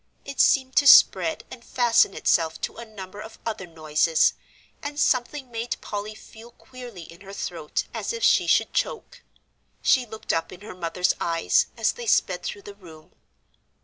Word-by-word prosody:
It 280 - -8
seemed 260 -1 +3
to 285 - +5
spread 180 -9 +6
and 245 -2 -11
fasten 240 -6 +2
itself 160 -1 +1
to - - -4
a 235 - -8
number 205 -2 -10
of 220 +1 -11
other 210 -5 -4
noises, 160 0 +1 0.5
and 290 0 -6
something 255 0 0
made 230 +1 -4
Polly 210 +1 -6
feel 225 +2 -14
queerly 240 -6 -12
in 165 +2 -15
her 195 0 -11
throat 165 -6 -4
as - - -3
if 465 -1 -5
she - - +4
should - - +2
choke. - - -3 0.6
She 250 -2 +3
looked 220 0 -4
up 165 0 -2
in 185 - -12
her 210 - -9
mother's 180 0 -1
eyes, 170 - +1
as - - +2
they 475 0 -9
sped - - +2
through 400 - -6
the 205 - -10
room. 165 -6 -16
215 Hz, 175 wpm, -24 LUFS, 175-255 Hz, 0.6 s, spread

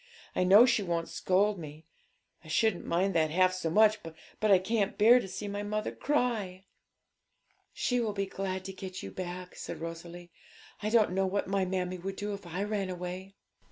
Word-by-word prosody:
I - - +2
know 200 +6 +8
she 240 -4 +2
won't 170 -3 -2
scold 200 +2 +1
mo; 155 0 -9 0.6
I - - -14
shouldn't 195 +4 +1
mind 190 +3 +1
that 160 -2 +2
half 185 +3 +3
so 185 -3 -2
much, 215 +4 +4
but 165 +6 -5
I 195 - +8
can't 200 +2 -1
bear 230 +4 +7
to 215 - -5
see 200 +2 -6
my 205 0 -3
mother 215 +1 -2
cry.' 220 -10 -1 1.1
'She 245 -1 0
will 220 -3 -1
be 200 -1 -1
glad 190 -1 -4
to 190 - -6
get 185 -1 -7
you - - -6
back,' 180 0 -6
said - - -7
Rosalie. 170 +1 -8 0.5
'I 210 - -1
don't 220 -4 +4
know 190 +1 +1
what 200 +1 -1
my 195 0 +1
mammie 185 -1 -2
would 190 +2 -5
do 205 +1 -4
if 200 -3 -8
I 180 +4 -3
ran 205 -2 -2
away.' 185 +2 -6
190 Hz, 195 wpm, -30 LUFS, 180-205 Hz, 1.1 s, know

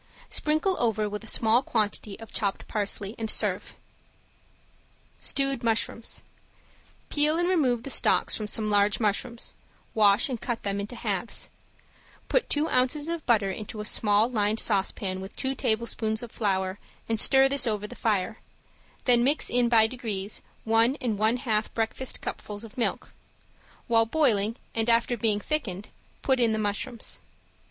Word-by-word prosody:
Sprinkle 310 +5 +1
over 220 -3 +1
with 210 +1 -5
a - - -9
small 225 +2 +4
quantity 215 -4 -2
of 225 - -11
chopped 200 -2 -2
parsley, 205 -1 -1
and 220 -1 -2
serve. - - -1 1.4
~STEWED 275 -2 +1
MUSHROOMS~ 230 0 -1 0.9
Peel 300 +2 +3
and 350 +1 +1
remove 260 -10 +2
the 275 - -5
stalks - - +2
from 215 - -3
some 215 +1 0
large 205 0 +2
mushrooms, 230 +2 -1 0.4
wash 205 0 +5
and 250 -5 -4
cut 240 -3 -3
them 200 0 -1
into 205 +4 -5
halves; 220 -1 -2 0.8
put - - +1
two 300 +2 +1
ounces 275 +5 +1
of 335 -2 -3
butter 210 -5 +3
into 215 +2 -7
a 210 - -4
small 210 +1 +3
lined 215 -2 0
saucepan 195 -2 0
with 190 - -9
two 265 0 -2
tablespoonfuls 225 -2 -1
of 235 - -8
flour 190 -2 -1 0.3
and 225 -1 +1
stir 270 +3 +6
this 270 -2 -1
over 210 -2 -1
the - - -8
fire, 215 -1 -1 0.7
then 240 -2 +4
mix 285 +4 +1
in 245 -1 +3
by 225 -2 +6
degrees 220 -4 -3 0.2
one 225 +3 +3
and 220 -5 -2
one 220 +3 +3
half 220 -4 -1
breakfast 230 +3 -2
cupfuls 210 +1 -6
of 225 -2 -11
milk; 240 - -2 0.7
while 225 -1 +4
boiling 230 -7 +2 0.2
and 225 +1 0
after 235 +1 +3
being 215 -2 +1
thickened, 210 - -3 0.3
put 265 -2 +2
in 230 -2 +3
the - - 0
mushrooms. 215 +3 -3
225 Hz, 155 wpm, -27 LUFS, 210-245 Hz, 1.4 s, stir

